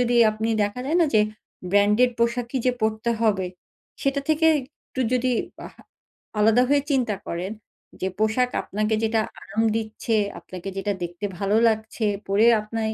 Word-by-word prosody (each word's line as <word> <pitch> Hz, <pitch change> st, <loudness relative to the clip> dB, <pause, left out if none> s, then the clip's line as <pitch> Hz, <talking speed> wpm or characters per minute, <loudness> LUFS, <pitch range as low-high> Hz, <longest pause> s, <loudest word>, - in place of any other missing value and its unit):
যদি 245 Hz, 0 st, +2 dB
আপনি 220 Hz, +1 st, -3 dB
দেখা 205 Hz, +5 st, -2 dB
যায় 315 Hz, -, +1 dB
না 330 Hz, -, +5 dB
যে 215 Hz, -, +6 dB, 0.5 s
ব্র্যান্ডেড 210 Hz, +5 st, +4 dB
পোশাকই 235 Hz, +2 st, 0 dB
যে 250 Hz, -, +4 dB
পরতে 220 Hz, +1 st, 0 dB
হবে 205 Hz, -5 st, +2 dB, 0.6 s
সেটা 275 Hz, 0 st, +1 dB
থেকে 315 Hz, +1 st, +3 dB, 0.4 s
একটু 260 Hz, -, -5 dB
যদি 255 Hz, 0 st, +2 dB, 0.3 s
বাহ -, -, -10 dB, 0.6 s
আলাদা 220 Hz, +4 st, +5 dB
হয়ে 285 Hz, 0 st, +3 dB
চিন্তা 240 Hz, -6 st, +1 dB
করেন। 180 Hz, +4 st, -3 dB, 0.5 s
যে 190 Hz, -, 0 dB
পোশাক 220 Hz, +4 st, +2 dB
আপনাকে 215 Hz, +2 st, -1 dB
যেটা 225 Hz, 0 st, +2 dB, 0.2 s
আরাম 215 Hz, +3 st, -2 dB
দিচ্ছে, 225 Hz, +1 st, -2 dB, 0.2 s
আপনাকে 185 Hz, +1 st, -8 dB
যেটা 200 Hz, +1 st, -1 dB
দেখতে 175 Hz, +3 st, -5 dB
ভালো 200 Hz, +2 st, +1 dB
লাগছে, 220 Hz, 0 st, -2 dB, 0.2 s
পরে 200 Hz, +3 st, +3 dB
আপনি 220 Hz, +2 st, -5 dB
220 Hz, 155 wpm, -24 LUFS, 205-245 Hz, 0.6 s, যে